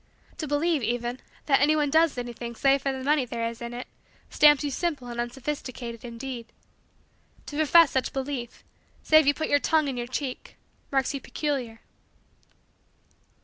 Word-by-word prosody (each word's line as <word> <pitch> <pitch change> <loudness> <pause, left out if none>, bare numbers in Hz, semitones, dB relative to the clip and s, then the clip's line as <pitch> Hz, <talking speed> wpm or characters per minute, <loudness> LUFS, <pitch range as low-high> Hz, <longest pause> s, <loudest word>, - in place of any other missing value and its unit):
To 310 - -3
believe, 295 +1 +1
even, 240 +2 -2 0.3
that 275 -2 +3
anyone 295 0 +3
does 320 -3 +3
anything 240 -1 -5
save 275 +2 +3
for 275 - 0
the 265 -1 -5
money 295 0 +3
there 230 -1 -3
is 230 0 -7
in 235 0 -5
it 245 +1 -6 0.5
stamps 295 -1 +6
you 290 - -2
simple 295 -4 -2
and 240 0 -3
unsophisticated, 240 -2 -5
indeed. 235 0 -6 1.0
To 290 - -8
profess 315 +1 +6
such 260 - 0
belief, 265 -3 -5 0.4
save 310 -2 +5
you 285 - +4
put 315 - -2
your 285 - +3
tongue 310 0 +2
in 265 -3 -3
your 240 0 -3
cheek, 255 0 -5 0.3
marks 270 0 +1
you 275 - -4
peculiar. 255 -7 -3
270 Hz, 160 wpm, -26 LUFS, 240-295 Hz, 1.0 s, stamps